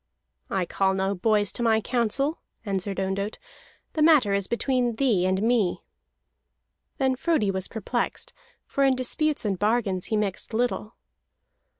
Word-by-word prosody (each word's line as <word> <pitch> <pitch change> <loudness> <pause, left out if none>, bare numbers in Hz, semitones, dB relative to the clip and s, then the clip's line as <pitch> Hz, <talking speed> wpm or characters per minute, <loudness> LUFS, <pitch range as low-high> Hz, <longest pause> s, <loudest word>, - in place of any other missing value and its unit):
"I 190 -2 0
call 190 +2 +1
no 190 +1 0
boys 205 +1 +1
to - - -5
my 225 -2 +3
counsel," 250 +6 0 0.3
answered 195 -1 -2
Ondott. 195 +2 -2 0.6
"The 310 - -1
matter 300 -10 +5
is 200 -1 +1
between 245 -1 0
thee 220 -8 +2
and 190 +2 0
me." 225 -6 +1 1.1
Then 265 -1 +1
Frodi 260 - +1
was 190 -1 -2
perplexed, 235 +2 -3 0.3
for 275 - 0
in 270 -1 +4
disputes 290 +3 0
and 195 -3 -1
bargains 205 -4 0
he 220 - -1
mixed 210 +2 -2
little. 235 -2 -1
220 Hz, 140 wpm, -25 LUFS, 195-250 Hz, 1.1 s, matter